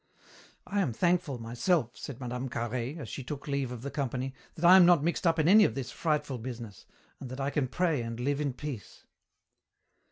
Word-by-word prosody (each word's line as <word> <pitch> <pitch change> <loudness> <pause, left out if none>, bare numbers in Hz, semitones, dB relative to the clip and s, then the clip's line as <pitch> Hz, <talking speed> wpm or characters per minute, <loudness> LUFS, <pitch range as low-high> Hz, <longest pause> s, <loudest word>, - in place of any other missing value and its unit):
"I 200 0 0
am 135 -11 0
thankful, 175 -2 +1
myself," 120 +4 0
said 135 -3 -8
Mme. 125 0 -4
Carhaix, 120 +4 -3
as 135 - -6
she 135 - -6
took 140 +3 -7
leave 140 -3 -1
of 120 -1 -7
the 140 - -4
company, 135 -1 -2 0.2
"that 165 - -2
I 180 +2 +9
am 190 - +9
not 170 -4 +5
mixed 170 +2 0
up 165 0 +3
in 155 -1 +2
any 210 +4 +8
of 110 - +1
this 135 -3 -4
frightful 150 -5 -1
business, 115 -4 -8 0.3
and 130 - -7
that 130 +2 -7
I 140 +1 -1
can 140 -3 0
pray 160 0 0
and 115 0 -5
live 140 +3 0
in 140 -3 -1
peace." 135 -5 -8
135 Hz, 210 wpm, -30 LUFS, 125-155 Hz, 0.3 s, I